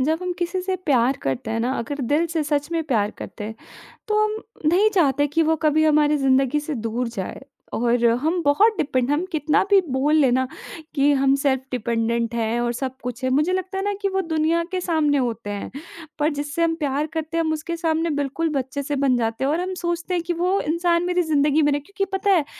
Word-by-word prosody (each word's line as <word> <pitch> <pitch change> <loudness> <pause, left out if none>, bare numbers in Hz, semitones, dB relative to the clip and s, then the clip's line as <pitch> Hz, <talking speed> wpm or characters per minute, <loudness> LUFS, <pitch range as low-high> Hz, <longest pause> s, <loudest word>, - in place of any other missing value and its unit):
जब 315 +5 +1
हम 360 - -2
किसी 360 +1 -1
से 375 0 -1
प्यार 270 -7 +2
करते 135 - -2
हैं 225 +1 -1
ना, 250 +3 0
अगर 280 +5 -4
दिल 325 +3 +3
से 330 -1 -1
सच 290 +1 -1
में 330 - 0
प्यार 220 -8 +1
करते 210 - -7
हैं, 220 +1 -6 0.5
तो 425 0 +2
हम 430 0 0 0.3
नहीं 370 +7 +4
चाहते 290 -4 +3
कि 310 +3 +1
वो 320 +1 +2
कभी 310 +1 +4
हमारी 300 -1 +4
ज़िंदगी 270 +1 +2
से 300 +1 -4
दूर 230 +1 -2
जाए 230 +1 -6 0.3
और 240 0 +1 0.2
हम 335 +4 0
बहुत 410 +11 +4
डिपेंड 260 -5 0
हम 305 +5 +1
कितना 300 -2 +2
भी 400 -1 +7
बोल 280 +4 +2
लें 275 -5 +4
ना 260 +1 +1 0.5
कि 285 0 +4
हम 270 -1 +3
सेल्फ़ 265 -2 +2
डिपेंडेंट 235 -1 -1
हैं 230 +1 0
और 240 0 0
सब 260 +1 -4
कुछ 250 +1 -5
है, 255 - +1
मुझे 300 +7 +2
लगता 375 +1 -3
है 385 - -1
ना 410 0 0
कि 400 - +1
वो 385 0 0
दुनिया 325 0 +1
के 370 -1 -1
सामने 310 -5 +1
होते 230 -4 -2
हैं, 205 -1 -5 0.5
पर 300 +1 +3
जिससे 290 +3 -2
हम 330 -1 +1
प्यार 295 -1 -1
करते 320 0 -3
हैं, 330 - +2
हम 315 0 0
उसके 320 +2 -4
सामने 325 0 0
बिल्कुल 290 +4 -1
बच्चे 275 0 -3
से 290 +1 -2
बन 270 -2 +2
जाते 225 +2 -1
हैं 275 - +2
और 320 - 0
हम 370 +1 -3
सोचते 345 +1 -2
हैं 345 -2 0
कि 350 - -2
वो 360 +4 +1
इंसान 340 +2 +1
मेरी 360 0 +1
ज़िंदगी 295 +1 +3
में 295 - +3
ना 285 - +1
क्योंकि 395 +6 -3
पता 400 +1 +1
है 330 -6 +3
295 Hz, 230 wpm, -22 LUFS, 260-335 Hz, 0.5 s, भी